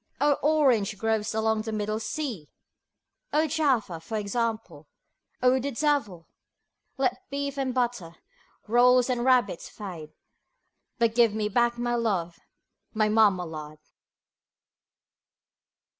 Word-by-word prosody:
O 290 0 +4
orange 255 -9 +2
groves 220 0 -1
along 220 0 +1
the 220 0 -5
Middle 215 0 -2
Sea! 220 - -5 0.8
(O 305 +2 +2
Jaffa, 270 - 0
for 215 +7 -5
example) 215 -7 -3 0.6
O 255 +1 +4
the 275 +2 -2
devil 230 - -1 0.7
Let 260 -2 -1
Beef 280 0 -3
and 270 -2 -1
Butter, 240 -9 -2 0.5
Rolls 250 +2 +4
and 240 -1 -1
Rabbits 245 -8 +2
fade, 170 -7 -9 0.8
But 230 -3 +2
give 230 -3 +3
me 210 -1 -1
back 240 +2 +1
my 240 0 -1
love, 195 -8 -1 0.6
my 215 -1 +2
Marmalade. 180 -8 +1
225 Hz, 115 wpm, -26 LUFS, 205-255 Hz, 0.8 s, O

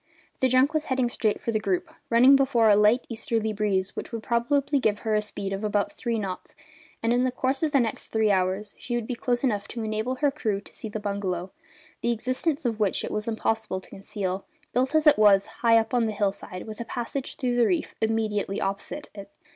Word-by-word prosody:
The 260 - +3
junk 260 +4 +3
was 310 -1 0
heading 260 -2 +1
straight 220 -3 0
for 230 - -2
the 215 - +1
group, 195 -3 -2 0.2
running 250 +4 +7
before 260 -5 +4
a - - +7
light 210 +4 +4
easterly 225 -1 -1
breeze 195 -2 0
which - - -6
would 230 -2 -5
probably 275 +4 +1
give 210 -4 0
her 220 - -1
a 210 - +3
speed 200 -2 -4
of 195 +2 -4
about 205 -1 0
three 235 +2 -2
knots, 190 -3 -5 0.5
and 230 +1 +2
in 245 +1 +2
the 255 - +1
course 260 +2 -1
of 315 -2 +1
the 280 - +4
next 230 -3 -2
three 220 -1 +2
hours 190 +2 0
she 240 - -3
would 240 -2 -2
be 250 - -3
close 245 +1 -1
enough 205 -6 0
to 230 - -5
enable 220 +4 -2
her 285 +2 +1
crew 220 -9 -1
to - - -17
see 220 - -6
the 215 - -4
bungalow, 195 -3 -3 0.5
the 235 - +1
existence 255 +6 -1
of 225 -2 -1
which 205 -3 +1
it - - -4
was 210 +1 -3
impossible 220 -3 -1
to - - -15
conceal, 195 -1 -4 0.3
built 260 +4 +1
as 310 0 +3
it 295 -6 +6
was 200 -2 +6 0.2
high 230 -1 +6
up 225 +2 0
on 240 -2 +2
the 215 - -2
hill 205 -1 +1
side 185 -2 -8
with 215 +1 -7
a - - -4
passage 245 +3 -4
through 250 -2 -1
the 240 -2 +4
reef 345 -3 -1
immediately 215 -3 0
opposite 200 +9 -3
it. 200 -1 -10
225 Hz, 230 wpm, -26 LUFS, 205-250 Hz, 0.5 s, running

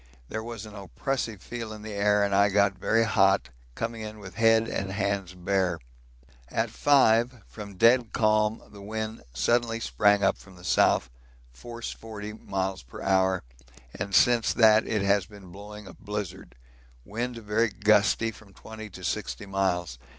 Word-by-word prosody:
There 110 - -3
was 115 -2 -7
an 105 - -11
oppressive 110 +1 -4
feel 115 -2 -6
in 105 -1 -9
the 110 -1 -6
air 105 0 +2
and 100 -1 0
I 100 +1 +4
got 100 0 +3
very 115 +4 +2
hot, 95 - +3 0.3
coming 115 0 -4
in 110 0 -7
with 100 -3 -10
head 115 0 +4
and 95 -3 -3
hands 100 -2 -2
bare. 90 -1 0 0.7
At 110 0 -1
5, 120 -4 +3
from 100 -2 -10
dead 115 +3 +4
calm 110 0 +1
the 100 - -12
wind 110 +2 -5
suddenly 115 - +1
sprang 105 -2 +2
up 95 - +2
from 95 -1 -16
the 90 - -15
south, 60 - +2 0.4
force 115 - -7
40 105 -1 -8
miles 95 -3 -3
per 60 - -11
hour, 95 -1 +2 0.5
and 100 +1 -3
since 120 -2 +4
that 110 -2 +5
it 105 -3 0
has 100 -1 +2
been 100 -4 -14
blowing 105 +2 -10
a - - -11
blizzard; 105 - -6 0.5
wind 120 +3 -4
very 110 +1 0
gusty, 105 +2 +2
from 100 -3 -17
20 110 -1 -9
to - - -12
60 60 +9 -3
miles. 90 -8 -1
105 Hz, 165 wpm, -27 LUFS, 95-110 Hz, 0.7 s, that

